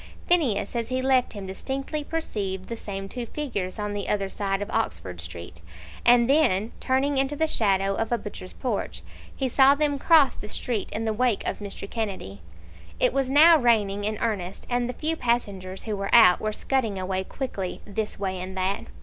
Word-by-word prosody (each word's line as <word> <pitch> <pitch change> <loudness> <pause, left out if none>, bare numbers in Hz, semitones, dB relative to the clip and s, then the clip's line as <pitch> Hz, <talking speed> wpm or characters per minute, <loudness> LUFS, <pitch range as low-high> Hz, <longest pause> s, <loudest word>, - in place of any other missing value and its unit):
Phineas 295 - +2
as 230 -1 -2
he 255 0 0
left 260 -1 +2
him 200 -2 -7
distinctly 270 +10 -4
perceived 200 - -4
the 230 - -3
same 195 -3 -6
two 240 +3 -6
figures 220 -11 -4
on 210 -1 -3
the 205 -1 -3
other 200 -2 0
side 195 -1 -2
of 205 +1 -4
Oxford 90 - -2
Street, 85 0 -9 0.4
and 240 -1 +6
then 245 -8 +3
turning 270 +2 +1
into 270 +2 0
the 320 - +1
shadow 195 -8 +1
of 225 +3 -2
a 240 - +3
butcher's 205 -4 -8
porch, 245 -6 -3 0.3
he 265 - -1
saw 270 +2 +5
them 290 -1 0
cross 310 -3 +5
the 210 - -9
street 225 0 -2
in 225 +2 -3
the 220 - 0
wake 240 -1 +1
of - - -2
Mr. 200 -1 -7
Kennedy. 195 - -4 0.6
It - - +3
was 270 -1 0
now 315 +4 +7
raining 210 -5 +2
in 215 +1 -1
earnest, 200 -5 -3
and 245 0 0
the - - -3
few 315 +4 -1
passengers 200 -8 -2
who 215 -2 -3
were 195 0 -3
out 220 -7 +7
were 215 - -1
scudding 225 -2 -1
away 185 0 -2
quickly, 195 -5 -5
this 210 +1 -3
way 190 -2 -3
and 190 +1 -6
that. 190 +2 -1
220 Hz, 190 wpm, -25 LUFS, 195-260 Hz, 0.6 s, now